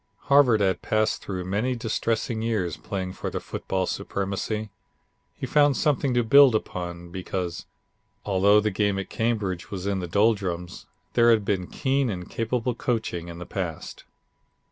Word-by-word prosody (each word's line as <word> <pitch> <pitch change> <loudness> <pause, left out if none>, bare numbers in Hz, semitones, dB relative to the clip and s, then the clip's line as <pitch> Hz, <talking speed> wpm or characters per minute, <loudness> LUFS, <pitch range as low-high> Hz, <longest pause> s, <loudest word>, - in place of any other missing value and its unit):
Harvard 130 -6 +6
had 95 -2 +1
passed 110 0 0
through 95 -2 -5
many 110 +7 0
distressing 115 0 -1
years 105 -8 -1
playing 95 -2 -5
for - - -4
the - - -3
football 95 -1 -3
supremacy. 100 +3 -3 0.6
He - - -5
found 145 -2 +3
something 140 -3 +1
to 120 - +3
build 135 +1 +7
upon, 85 -4 -4
because, 90 -1 -4 0.6
although 100 +1 +4
the 105 0 0
game 100 0 +1
at 95 - -5
Cambridge 100 -6 -1
was 95 -2 -5
in 100 -1 0
the 90 - -4
doldrums, 95 -3 0 0.3
there 120 0 +5
had 110 -3 +4
been 95 -3 -1
keen 135 -1 0
and 90 -4 -5
capable 120 +2 -1
coaching 110 -8 -2
in 85 0 -8
the 90 - -7
past. 85 -5 -5
100 Hz, 155 wpm, -25 LUFS, 95-115 Hz, 0.6 s, build